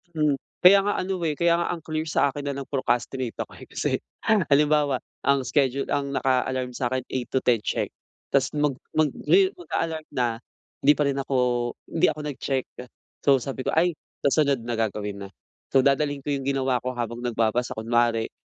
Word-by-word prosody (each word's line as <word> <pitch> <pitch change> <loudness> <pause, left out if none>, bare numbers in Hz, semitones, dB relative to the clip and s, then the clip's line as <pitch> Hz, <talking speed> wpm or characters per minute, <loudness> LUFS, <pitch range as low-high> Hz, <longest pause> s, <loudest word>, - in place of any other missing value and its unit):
Hmm. 150 -3 +2 0.2
Kaya 195 +2 +9
nga 205 +1 0
ano 185 0 -2
eh, 150 - -1
kaya 170 +2 +3
nga 170 - 0
ang 165 - -12
clear 155 0 -3
sa 140 -2 +2
akin 145 0 -6
na 140 - -2
lang 140 -1 -5
procrastinate 125 -2 -1
ako - - -5
eh, - - -12
kasi - - -2 0.6
halimbawa, 145 -1 +3 0.3
ang 140 -1 +4
schedule 135 +1 +1
ang 140 -1 -1
naka-alarm 130 -1 0
sa 125 0 -2
akin, 130 0 -1
eight 125 -2 -2
to 130 - 0
ten 120 -3 +3
check. - - -2 0.4
Tapos 135 -2 +3
mag 150 -1 +2 0.2
magri 375 - +3
mag-a-alarm 165 - -3
na, 120 -3 0 0.4
hindi 145 +2 +6
pa 150 - +1
rin 140 -1 0
ako 135 0 -2 0.6
hindi 165 - +3
ako 155 - -4
nag-check. 135 -1 -2 0.6
So, 140 -1 +7
sabi 135 -1 -4
ko, - - 0
"Ay 175 +2 +4 0.3
sa 140 +2 +3
sunod 140 -5 +1
na, 120 +1 -3
gagawin 105 -2 -3
na." - - -17 0.4
So, 135 -1 +4
dadalhin 140 0 +1
ko 145 - -2
'yong 135 -1 -2
ginawa 135 -2 +1
ko 125 +1 -4
habang 120 0 -3
nagbabasa 120 0 0
kunwari. 115 0 +1
135 Hz, 190 wpm, -25 LUFS, 125-150 Hz, 0.6 s, Kaya